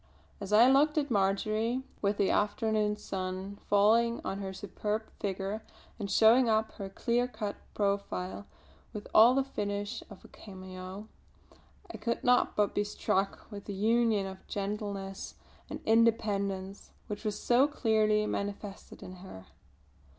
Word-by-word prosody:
As 200 0 -6
I 220 +4 +7
looked 290 +4 +4
at 285 -3 0
Marjory, 215 +5 +1 0.2
with 200 0 +1
the 195 - +2
afternoon 210 -1 +1
sun 190 0 -5
falling 225 +3 +4
on 195 - -3
her 195 -1 -4
superb 210 +2 -3 0.2
figure 200 +2 -3 0.4
and 200 -2 -4
showing 230 +4 +5
up 220 0 +2
her 195 -2 -7
clear 240 +4 0
cut 220 -4 -4 0.2
profile 200 -1 -2 0.5
with 210 -2 -7
all 235 +4 +8
the 275 - +3
finish 205 -5 -3
of - - -13
a - - -11
cameo, 185 +1 -9 0.9
I - - -6
could 235 -1 -2
not 250 0 +3
but 210 -1 +2
be 205 - +1
struck 195 -1 -1
with 200 -1 -8
the 200 - -5
union 220 0 +2
of 190 0 -9
gentleness 200 -1 -4 0.3
and - - -6
independence 200 -4 +1
which 210 +1 -6
was 210 -2 -2
so 250 +4 +4
clearly 215 -6 +2
manifested 200 -1 -5
in 185 0 -9
her. 180 - -11
210 Hz, 145 wpm, -30 LUFS, 195-225 Hz, 0.9 s, all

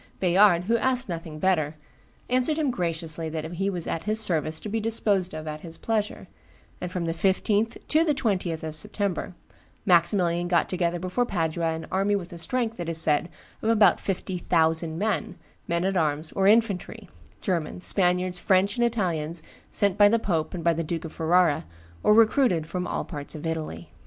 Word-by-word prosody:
Bayard, 180 -1 +5
who 230 +5 +2
asked 260 +1 +1
nothing 165 -2 -5
better, 155 -3 +1 0.5
answered 255 +5 +1
him 300 -4 +1
graciously 165 -5 -3
that 155 0 -4
he 195 +3 -1
was 175 -4 -4
at 165 - -3
his 215 +1 +2
service 160 -6 0
to - - -6
be 225 +2 -1
disposed 205 -5 0
of 155 0 -6
at 155 0 -5
his 165 -1 -9
pleasure;" 215 -2 -2 0.5
and 180 - -4
from 180 -2 -2
the 165 - -1
15th 205 +5 +1
to 315 +2 +5
the 305 -3 +1
20th 185 -10 -1
of 160 -1 -4
September, 200 -1 -3 0.5
Maximilian 175 0 +3
got 175 -1 +2
together 175 -1 0
before 185 +7 -1
Padua 165 -3 -1
an 160 - -6
army 195 +2 +2
with 180 -3 -5
a 170 - -8
strength, 230 +2 -2
it 170 -1 -3
is 165 -1 0
said, 155 +2 +2 0.3
of 220 - 0
about 215 -2 +5
fifty 190 -1 -3
thousand 160 -1 +1
men, 210 +3 -1 0.3
men 170 +1 0
at 195 0 0
arms 155 -2 0
or 195 0 +1
infantry, 215 -3 +1 0.3
Germans, 180 -2 -2
Spaniards, 180 -1 +1
French, 195 +3 +2
and 240 - +2
Italians, 170 -8 -1 0.3
sent 200 -2 +1
by 205 0 +8
the 230 - +3
pope 175 -7 -1
and 170 - -5
by 170 0 +4
the 165 +1 -2
Duke 165 +1 -4
of 160 - -8
Ferrara, 165 - +2 0.4
or 210 - +5
recruited 225 - +4
from 180 +2 -4
all - - -2
parts 145 -2 -6
of 155 - -7
Italy. 155 - -4
180 Hz, 185 wpm, -26 LUFS, 165-205 Hz, 0.5 s, by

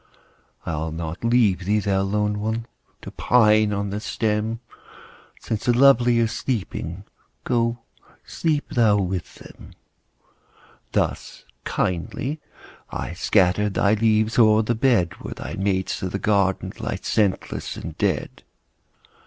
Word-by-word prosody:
I'll 80 0 -3
not 80 +3 -6
leave 115 -5 +3
thee, 105 +3 +2
thou 100 -1 0
lone 105 +1 0
one! 110 +2 -2 0.4
To - - -8
pine 110 -3 +3
on 100 -1 -2
the 105 - -3
stem; 110 +1 -1 0.8
Since 110 -2 -4
the 120 -1 +3
lovely 120 -3 +5
are 115 - +3
sleeping, 100 - -4 0.4
Go 120 -1 0 0.5
sleep 155 -3 -1
thou 110 -4 +3
with 95 -2 -3
them. - - -14 1.2
Thus - - -2 0.2
kindly 130 - -2 0.5
I - - -5
scatter 95 +2 +2
Thy 100 +1 +2
leaves 110 +1 +2
o'er 110 -1 +5
the 120 - 0
bed, 115 -7 +1
Where - - -6
thy - - -7
mates 95 -1 -1
of 95 - -4
the - - 0
garden 100 -2 +1
Lie - - -3
scentless 100 -4 -1
and - - -7
dead. - - -1
105 Hz, 130 wpm, -23 LUFS, 95-115 Hz, 1.2 s, lovely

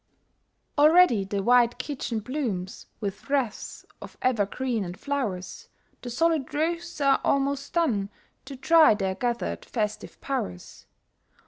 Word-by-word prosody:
Already 305 - +6
the 195 0 -3
wide 240 +1 +4
kitchen 240 -6 -4
blooms 215 -8 -4
With 205 +4 -6
wreaths 270 -6 -2 0.2
of - - -11
evergreens 235 0 0
and 180 0 -7
flowers, 240 -11 -4 0.3
The 245 - -6
solid 305 +3 0
roasts 335 +2 -2
are 275 -1 +3
almost 275 0 0
done, 235 - +1 0.4
To 275 +1 -8
try 315 -2 +5
their 190 -2 -1
gathered 240 +4 -3
festive 215 -3 -4
powers. 90 - -5
250 Hz, 120 wpm, -26 LUFS, 205-285 Hz, 0.4 s, Already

